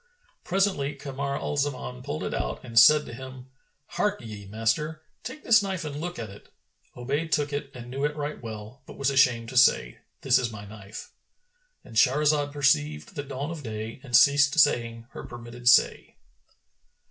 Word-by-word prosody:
Presently 185 -7 0
Kamar 140 0 -4
al 145 - -4
Zaman 130 - -3
pulled - - -5
it - - -3
out - - -3
and 115 -2 +3
said 150 +5 +7
to - - -9
him, 130 +1 -10 0.5
"Harkye, 115 - -3
master; 150 +9 -1 0.2
take 260 +5 -8
this 230 -1 +5
knife 190 -4 -3
and 145 -2 -5
look 175 +1 -5
at 110 -4 -6
it." 100 - -15 0.5
Obayd 140 +6 -2
took 145 -1 0
it 145 -1 -3
and 120 0 -9
knew 135 +2 -4
it 150 0 0
right 150 0 -5
well, 110 +3 -9
but - - -11
was 140 0 +1
ashamed 125 -4 +3
to 130 - -4
say, - - +4 0.2
"This 130 -2 +4
is 120 -2 -2
my 105 -1 -9
knife;"— 105 0 -10 0.7
And 110 - -9
Shahrazad 145 +3 +3
perceived 75 - 0
the 145 - -4
dawn 140 +2 -5
of 165 -3 -6
day 110 -1 -6
and 125 -4 +3
ceased 145 +2 +5
saying 115 -5 +2
her - - -8
permitted 120 0 -3
say. 130 - +3
130 Hz, 175 wpm, -26 LUFS, 115-145 Hz, 0.7 s, said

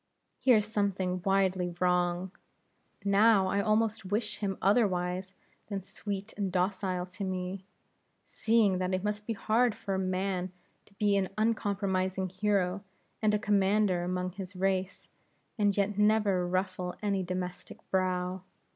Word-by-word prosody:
Here's 225 -5 +4
something 195 -4 -1
widely 190 -2 +1
wrong. 180 0 +1 0.7
Now 200 0 +5
I 195 +2 +1
almost 220 +1 +1
wish 210 +3 -2
him 195 -3 -2
otherwise 185 -3 +1 0.3
than 200 -3 -4
sweet 200 +1 -6
and 200 -2 -2
docile 185 0 0
to 185 +2 -8
me, 185 0 -4 0.6
seeing 220 -5 +2
that 185 0 0
it 185 - -3
must 210 0 -3
be 230 - 0
hard 220 +2 +2
for 195 -3 -3
man 185 -1 -1 0.4
to 200 - -23
be 205 -1 +2
an 190 -2 0
uncompromising 195 -4 0
hero 195 0 0 0.4
and 215 -1 +3
a - - +3
commander 200 -3 +2
among 180 +1 -2
his 190 +1 -8
race, 190 0 -1 0.5
and 205 -1 +2
yet 205 0 0
never 210 -4 +3
ruffle 185 0 -2
any 200 -2 +1
domestic 180 0 -5
brow. 185 0 0
195 Hz, 135 wpm, -30 LUFS, 185-210 Hz, 0.7 s, Now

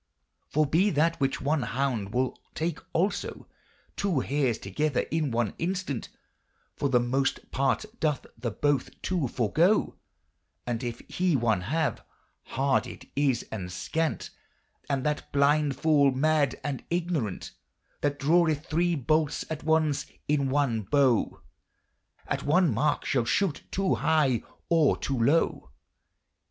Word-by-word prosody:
For 155 0 +2
he 190 +6 +4
that 165 0 +1
with 135 -1 0
one 145 +2 +1
honnde 120 -2 -1
wol 125 +3 0 0.2
take 165 0 -2
also 190 +5 -1 0.5
Two 185 -9 0
harys 135 -5 0
togyther 135 +9 -1
in 155 -2 0
one 115 -3 0
instant 180 -7 -2 0.7
For 140 - -1
the 125 -2 +4
moste 135 +3 -1
parte 135 +9 +1
doth 150 -4 0
the 120 +1 -3
both 140 +4 -1
two 175 -7 0
forgo, 160 - +2 0.7
And 120 -1 -2
if 120 -1 -4
he 180 -3 +1
one 115 -6 +2
have: 155 - -1 0.5
harde 135 +1 +2
it - - -10
is 135 -4 +1
and 95 -5 -5
skant 160 - -2 0.6
And 140 -1 -1
that 150 0 -2
blynd 145 0 +3
fole 145 -1 +4
mad 145 0 +1
and 140 -3 -3
ignorant 165 - -2 0.5
That 145 0 0
draweth 155 +1 +2
thre 170 +2 +1
boltis 155 +3 +1
atons* 155 -2 0 0.2
in 140 -2 +1
one 135 -5 +1
bowe 130 +1 +2 0.8
At - - -2
one 160 -1 +3
marke 145 +7 0
shall 125 -4 +1
shote 180 - +1
to[o] 195 0 0
high 145 -7 +2 0.3
or 165 -4 +3
to[o] 140 - -3
lowe. 140 - +2
145 Hz, 135 wpm, -28 LUFS, 130-160 Hz, 0.8 s, he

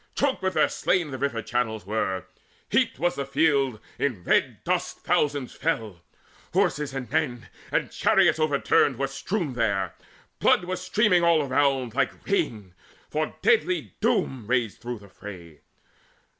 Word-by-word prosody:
Choked 280 -2 +1
with 185 0 -1
their - - +4
slain 175 -5 0
the 130 - -5
river 120 -5 -1
channels 110 -5 -2
were, 95 -3 -1 0.5
Heaped - - +2
was 175 +5 +1
the 140 - -3
field; 140 -4 +2 0.2
in 120 -11 -1
red - - +1
dust - - -1
thousands 145 -3 0
fell, 110 - -2 0.5
Horses 140 -1 +1
and 130 -2 -4
men; 135 -7 -1 0.2
and - - 0
chariots - - +3
overturned 145 -3 +2
Were 135 - 0
strewn 140 +4 -3
there: 100 -7 0 0.5
blood - - +4
was 180 0 -4
streaming 185 -2 +3
all 165 -3 +4
around 135 -3 +1
Like 135 0 -1
rain, 110 - -1 0.4
for 155 0 -2
deadly 400 -6 +2
Doom 125 -6 0
raged 120 -4 0
through 120 0 -4
the 100 -1 -15
fray. 90 -6 -11
135 Hz, 145 wpm, -26 LUFS, 115-155 Hz, 0.5 s, their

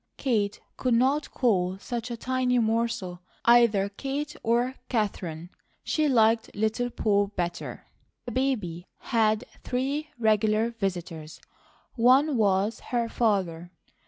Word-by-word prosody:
Kate 215 -6 0 0.2
could 250 -2 +1
not 270 +5 +2
call 190 -7 +1
such 235 +3 -5
a 235 - -4
tiny 255 +1 0
morsel 225 -6 -1 0.2
either 235 -5 +5
Kate 280 +8 -4
or 240 +3 +1 0.2
Katherine; 180 -7 -2 0.3
she 310 -1 +1
liked 225 -2 +3
"Little 220 +4 0
Poll," 205 -4 +1
better. 175 -4 -5 0.4
The 245 - -5
baby 210 -10 -1
had 220 -2 +1 0.2
three 275 +4 -2
regular 220 0 +2
visitors. 175 -7 -5 0.5
One 260 +5 +4
was 205 0 +1
her 235 -2 -2
father. 185 -8 0
225 Hz, 115 wpm, -27 LUFS, 200-250 Hz, 0.5 s, either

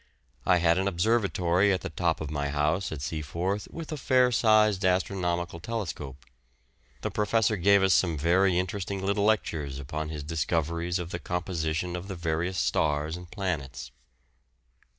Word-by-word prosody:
I 90 - +5
had 85 0 +3
an 95 - 0
observatory 100 -1 +2
at 95 - 0
the - - -5
top 85 -3 0
of 75 -2 -4
my 70 -1 -2
house 75 +6 0
at 75 -3 -5
Seaforth, 85 +7 -3
with 165 -1 -7
a 155 - -3
fair 125 -2 +3
sized 110 -3 +4
astronomical 90 -2 0
telescope. 80 - -5 0.8
The - - -3
professor 110 0 +2
gave 100 +1 +4
us 95 -1 +4
some 85 -4 +2
very 90 +4 +3
interesting 95 +1 -2
little 100 +1 +1
lectures 80 -10 0
upon 75 +3 -4
his 75 -2 -5
discoveries 85 +3 -1
of 90 -1 -5
the 90 - -3
composition 90 -1 -2
of 90 +2 -6
the 95 - -5
various 85 +2 -2
stars 75 0 0
and 90 -1 -10
planets. 75 - -4
90 Hz, 155 wpm, -28 LUFS, 80-100 Hz, 0.8 s, I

